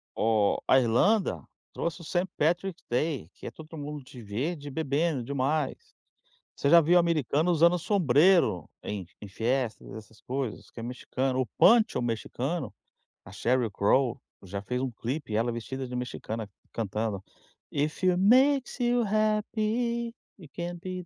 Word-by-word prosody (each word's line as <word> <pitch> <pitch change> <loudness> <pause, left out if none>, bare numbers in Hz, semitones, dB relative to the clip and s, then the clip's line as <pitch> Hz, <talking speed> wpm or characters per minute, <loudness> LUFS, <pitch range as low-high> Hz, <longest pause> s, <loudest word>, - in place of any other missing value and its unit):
o 110 -2 +2
a 130 - +6
Irlanda 185 - +2 0.3
trouxe 170 +1 -3
o - - -10
Saint 175 +4 -1
Patrick 175 +4 0
Day 125 - -1
que - - -10
é - - -5
todo 160 +1 -11
mundo 145 -1 -6
de 130 -2 -12
verde 140 +9 -3
e - - -6
bebendo 150 -1 0
demais. 140 +2 -1 0.8
Você 140 - +1
já 170 - +9
viu 175 +3 +5
americano 165 -1 +1
usando 170 +1 +4
sombreiro 170 - +3
em 100 -4 -5
em 105 - -9
festas 120 +3 -2
essas 110 0 -12
coisas 130 -4 -4
que - - -10
é - - -6
mexicano, 130 +2 -2
o 130 - 0
Poncho 230 -1 +5
mexicano, 125 +6 -3 0.5
a 90 - -11
Sheryl 120 +2 0
Crawl, 120 +5 +2 0.2
já 100 +1 -5
fez 125 +6 -3
um 130 - -2
clipe, 120 +1 -4
ela 115 +2 +1
vestida 130 +3 -5
de 125 - -6
mexicana, 115 -3 -4 0.2
cantando: 105 -2 -3 0.5
"If 150 +5 -2
it 185 -1 +4
makes 260 +7 +4
you 245 0 +2
happy, 215 +3 0 0.2
You 165 - -12
can 175 0 -4
be". 185 +1 -6
140 Hz, 155 wpm, -28 LUFS, 120-175 Hz, 0.8 s, já